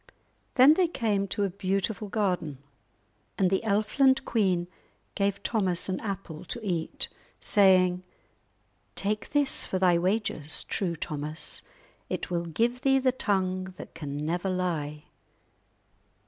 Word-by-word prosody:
Then 265 +4 +8
they 360 +2 +3
came 210 - -1
to 205 - -1
a 200 - +1
beautiful 195 +2 -2
garden, 180 - -1 0.8
and 190 -2 +2
the 190 - +2
Elfland 250 +6 +2
queen 185 -6 +1 0.5
gave 200 0 -1
Thomas 190 -6 +1
an 185 - -1
apple 190 -6 -6
to 235 - -4
eat, 170 -4 -2 0.3
saying:— 185 -3 +4 0.9
"Take 210 +2 -2
this 290 -2 +3
for 190 - -2
thy 180 -2 +4
wages, 180 -5 +2
true 175 -4 -2
Thomas; 150 +1 -1 0.5
it - - -4
will 170 -1 -1
give 235 +9 0
thee 270 -1 +4
the 260 -1 +2
tongue 185 -5 -1
that - - -10
can 145 -1 -5
never 175 +4 -1
lie." 160 -5 -2
190 Hz, 130 wpm, -28 LUFS, 175-215 Hz, 0.9 s, Then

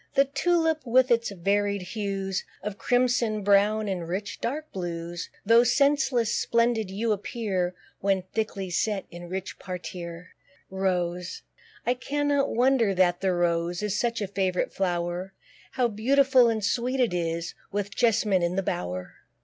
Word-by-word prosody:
The 275 - +5
Tulip, 325 +2 +1
with 255 +1 +3
its 235 -1 +3
varied 200 +1 0
hues 195 -1 -3 0.2
Of 205 0 -5
crimson, 245 -4 +1
brown, 205 +2 +3
and 180 -4 -3
rich 195 +4 -4
dark 300 +6 -3
blues, 175 -1 -5 0.2
(Tho' 230 +3 +6
scentless,) 255 -3 +2
splendid 235 -3 +1
you 215 +4 -1
appear, 195 -4 -2 0.2
When 195 -1 +1
thickly 200 -4 -2
set 200 +3 0
in 175 0 -9
rich 190 +1 -5
parterre. 180 -1 -7 0.4
ROSE. 180 -2 -2 0.4
I 245 - +3
cannot 285 +2 0
wonder 240 -4 +3
that 175 -1 +3
the 190 -1 +2
Rose 175 +1 0
Is 210 -1 -1
such 230 0 0
a - - -2
favourite 190 -2 -1
flower; 175 0 -2 0.4
How 250 -2 +2
beautiful 255 +3 +4
and 220 -3 -1
sweet 250 +4 0
it 240 -7 +2
is, 170 -1 -2 0.2
With 205 0 -3
jess'mine 215 -5 +3
in 175 +1 0
the 195 - 0
bower. 90 - -4
200 Hz, 145 wpm, -26 LUFS, 180-235 Hz, 0.4 s, Tho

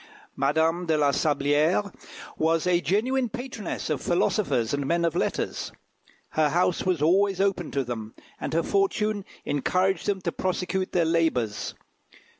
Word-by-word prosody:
Madame 160 +5 +1
de 160 -1 +2
la 145 -1 +3
Sablière 150 +7 +1 0.4
was 165 +1 +1
a 175 -1 +3
genuine 245 +7 +1
patroness 245 -3 -5
of 155 -4 -1
philosophers 175 - +1
and 140 -1 -1
men 170 +2 +1
of 165 -1 0
letters. - - -2 0.6
Her 155 -1 +2
house 175 +3 +1
was 180 -5 0
always 195 +3 +3
open 195 -4 0
to 140 - -1
them, 115 -3 -6 0.2
and - - -4
her 165 - +2
fortune 215 - 0 0.2
encouraged 185 +7 0
them 200 -2 +1
to 170 - -2
prosecute 185 +1 -2
their 175 -2 +2
labours. 160 -10 0
170 Hz, 145 wpm, -26 LUFS, 150-195 Hz, 0.6 s, la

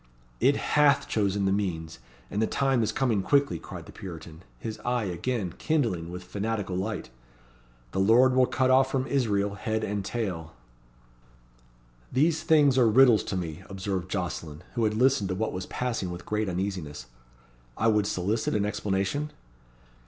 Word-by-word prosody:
"It 140 - +4
hath 150 -1 +3
chosen 100 -2 0
the 95 - +2
means, 85 -7 -2 0.3
and 105 - -1
the 110 - +2
time 135 -3 +1
is 110 - +1
coming 120 -7 +1
quickly," 140 - +2
cried - - -9
the - - -12
Puritan, 80 -3 -9 0.2
his 110 -1 -6
eye 120 +1 -1
again 95 +1 -2
kindling 115 - 0
with 90 +1 -7
fanatical 105 0 -3
light. 95 - -3 0.8
"'The 95 - -2
Lord 120 +6 +5
will 130 -1 +5
cut 130 -1 +1
off 130 +1 +5
from 130 -1 0
Israel 105 -8 0
head 110 +2 -2
and 100 -1 -2
tail.'" 90 - -4 1.6
"These 155 +4 +2
things 150 -5 +4
are 120 - +5
riddles 120 -1 +6
to 95 - -2
me," 85 -1 -5
observed 95 -2 -3
Jocelyn, 85 -4 -4
who 115 -3 +1
had 105 0 0
listened 125 -4 +3
to 95 - -1
what 110 +3 -2
was 90 0 -5
passing 115 -7 -2
with 85 0 -7
great 105 -1 -1
uneasiness. 90 -7 -4 0.7
"I 110 - 0
would 105 -2 +3
solicit 100 +6 -1
an 105 -1 +1
explanation?" 105 +8 -1
105 Hz, 160 wpm, -27 LUFS, 95-125 Hz, 1.6 s, riddles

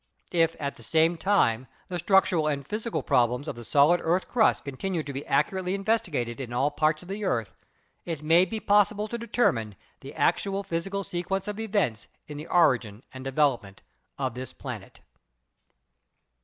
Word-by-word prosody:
If 165 -2 +2
at 140 -1 -4
the - - -13
same 160 +8 +2
time 130 - +2 0.2
the 180 -1 -4
structural 185 -3 +3
and 140 -2 -1
physical 220 +2 -3
problems 125 +4 +1
of 140 - -4
the 120 - -9
solid 145 +9 +4
earth 175 +3 +1
crust 230 -3 +2
continue 160 +5 -3
to 145 - -7
be 135 +2 -4
accurately 180 +6 +1
investigated 195 - -1
in 120 -3 -6
all 135 +4 +1
parts 155 +2 +1
of - - -14
the 200 +2 -5
earth, 115 - -1 0.5
it 160 -4 -5
may 165 +4 +5
be 220 +3 -4
possible 210 +1 +2
to 235 - -3
determine 165 - 0 0.2
the - - -10
actual 195 0 +1
physical 195 +2 -3
sequence 185 +2 -3
of 210 +1 -4
events 200 - -1 0.2
in 150 - -8
the 150 +3 -7
origin 125 - +2
and 130 0 -9
de 135 - -3
velopment 125 -9 0 0.4
of - - -2
this 130 +2 -7
planet. - - -8
165 Hz, 170 wpm, -27 LUFS, 130-195 Hz, 0.5 s, may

